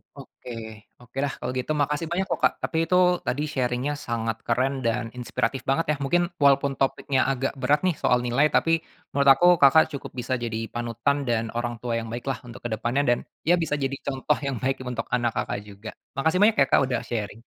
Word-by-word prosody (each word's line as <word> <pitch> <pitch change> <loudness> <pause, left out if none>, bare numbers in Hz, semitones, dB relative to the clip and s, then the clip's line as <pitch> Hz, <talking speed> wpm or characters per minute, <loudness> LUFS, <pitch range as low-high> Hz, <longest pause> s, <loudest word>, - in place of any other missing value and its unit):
Oke 125 - -11 0.5
oke 120 +2 -16
dah 140 - -1
kalau 125 - -3
gitu 140 - -3
makasih 150 +2 0
banyak 190 +2 +1
loh - - 0
Kak - - +5
tapi 160 - -2
itu 180 - +2 0.3
tadi 145 +4 0
sharing-nya 125 +1 -1
sangat 115 -2 -2
keren 130 +3 +1
dan 115 0 -1
inspiratif 125 +2 -2
banget 135 +5 +2
ya - - +1
mungkin 175 +5 +1
walaupun 140 -1 +4
topiknya 135 0 +1
agak 135 0 -1
berat 145 +4 +3
nih 185 -3 +2
soal 125 0 +2
nilai 125 +5 +3
tapi, 165 +1 +2 0.3
menurut 140 0 +1
aku 175 - +4
Kakak 160 +3 +6
cukup 140 - -7
bisa 125 0 -2
jadi 115 -1 -4
panutan 120 +4 -1
dan 115 -1 0
orang 120 0 -3
tua 115 -1 -1
yang 115 - -6
baik 120 +2 -5
lah 125 - -5
untuk 120 - -11
ke 120 - -3
depannya 120 +6 0
dan, 120 - +3 0.2
ya 175 +3 +4
bisa 155 -3 0
jadi 135 +1 -1
contoh 140 +2 0
yang 140 -2 -3
baik 135 +1 0
untuk 125 - -3
anak 120 -2 0
Kakak - - -2
juga, 100 +2 -9 0.2
makasih 160 +6 +1
banyak 210 +2 +5
ya - - -2
Kak - - +5
udah 130 - -1
sharing. 110 -2 -4
130 Hz, 210 wpm, -25 LUFS, 120-145 Hz, 0.5 s, Kakak